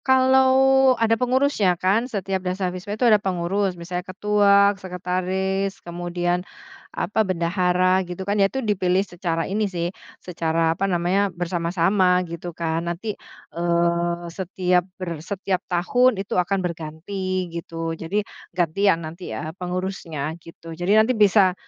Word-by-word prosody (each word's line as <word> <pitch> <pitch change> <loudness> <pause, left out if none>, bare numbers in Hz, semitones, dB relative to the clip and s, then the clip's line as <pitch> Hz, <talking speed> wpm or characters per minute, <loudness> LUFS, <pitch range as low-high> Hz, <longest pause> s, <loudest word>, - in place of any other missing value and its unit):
Kalau 265 0 +5
ada 225 0 +2
pengurusnya 250 -6 +2
kan 205 +8 +1
setiap 195 -4 -2
Dasawisma 185 +2 -3
itu 245 - +1
ada 215 -3 +5
pengurus. 190 0 -1
Misalnya 175 +1 -4
ketua, 200 0 +4
sekretaris, 190 +1 -2
kemudian 175 +1 -2 0.5
apa, 210 +5 -1
bendahara 185 0 +2
gitu 180 +2 -5
kan. 200 - 0
Ya 195 - +4
itu 265 +1 -4
dipilih 190 -2 +1
secara 170 -3 -2
ini 205 +1 -1
sih, 175 -1 -3 0.2
secara 165 -2 0
apa 195 +4 -1
namanya 185 +3 +1
bersama-sama 175 +1 +1
gitu 170 +1 -6
kan. 165 -1 -1
Nanti, 200 +5 -3 0.4
eee, 170 0 0
setiap 180 0 0
ber 170 -4 -5
setiap 190 +1 -2
tahun 215 +7 +2
itu 200 - -6
akan 185 +2 +1
berganti 180 +3 -4
gitu. 165 -1 -4
Jadi 180 +6 -2 0.3
ganti, 170 0 0
ya 165 - +4
nanti, 170 +2 -8
eee, 155 +8 -5
pengurusnya 180 -5 -3
gitu. 165 0 -11
Jadi 175 +4 -2
nanti 220 +4 +4
bisa 205 -4 +4
185 Hz, 135 wpm, -23 LUFS, 170-200 Hz, 0.5 s, Kalau